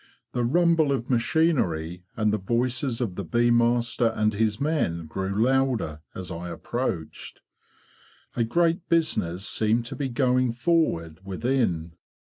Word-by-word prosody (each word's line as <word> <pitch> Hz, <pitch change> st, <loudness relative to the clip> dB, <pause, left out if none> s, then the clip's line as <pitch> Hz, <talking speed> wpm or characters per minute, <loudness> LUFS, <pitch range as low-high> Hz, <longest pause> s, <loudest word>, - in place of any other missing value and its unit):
The 120 Hz, -, -1 dB
rumble 165 Hz, +2 st, +3 dB
of 130 Hz, -2 st, -2 dB
machinery 115 Hz, -, +1 dB, 0.2 s
and 105 Hz, -1 st, +2 dB
the 105 Hz, -, 0 dB
voices 120 Hz, +4 st, -1 dB
of 110 Hz, -7 st, -1 dB
the 100 Hz, -, -5 dB
bee 120 Hz, +1 st, +2 dB
master 120 Hz, 0 st, +2 dB
and 110 Hz, -1 st, +1 dB
his 105 Hz, 0 st, 0 dB
men 140 Hz, -, 0 dB
grew 95 Hz, +6 st, -1 dB
louder 125 Hz, -, 0 dB
as 95 Hz, -1 st, -6 dB
I 85 Hz, +1 st, -5 dB
approached. 85 Hz, -1 st, -4 dB, 0.9 s
A 120 Hz, -, +2 dB
great 170 Hz, -, +1 dB
business 105 Hz, -, 0 dB
seemed 110 Hz, +2 st, +1 dB
to 130 Hz, -, -6 dB
be 135 Hz, 0 st, -2 dB
going 125 Hz, -1 st, +2 dB
forward 120 Hz, -, 0 dB
within. 95 Hz, -5 st, -1 dB
120 Hz, 135 wpm, -25 LUFS, 95-130 Hz, 0.9 s, rumble